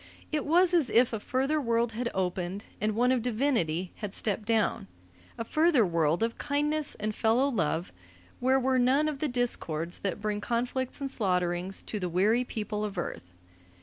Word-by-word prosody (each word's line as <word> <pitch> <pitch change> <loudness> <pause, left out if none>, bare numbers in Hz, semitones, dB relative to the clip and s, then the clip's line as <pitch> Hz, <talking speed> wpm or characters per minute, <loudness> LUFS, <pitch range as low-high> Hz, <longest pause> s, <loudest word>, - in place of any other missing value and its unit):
It 305 -2 -1
was 355 +3 +4
if 250 -7 +3
a 225 - -1
further 270 +7 0
world 235 -2 +1
had 235 +2 -2
opened, 185 +1 -2 0.2
and 215 0 0
one 245 +3 +3
of 255 -2 +2
divinity 215 - 0
had 210 -3 -6
stepped 210 0 -2
down; 220 - +1 0.5
a - - -2
further 305 -2 +3
world 165 +1 +1
of 230 0 -2
kindness 295 +1 -1
and 215 +1 -3
fellow 230 +5 +2
love, 170 - -1 0.5
where 260 +2 +3
were 260 0 +2
none 265 +5 +3
of 300 -3 -3
the 305 - 0
discords 175 - -1
that 195 0 -3
bring 210 0 -2
conflicts 250 +4 -2
and 275 -1 -2
slaughterings 180 -3 -1
to 210 - -4
the 180 -2 -2
weary 210 +8 +3
people 210 -3 -4
of 205 -3 -4
Earth. 90 - -5
230 Hz, 175 wpm, -29 LUFS, 190-260 Hz, 0.5 s, was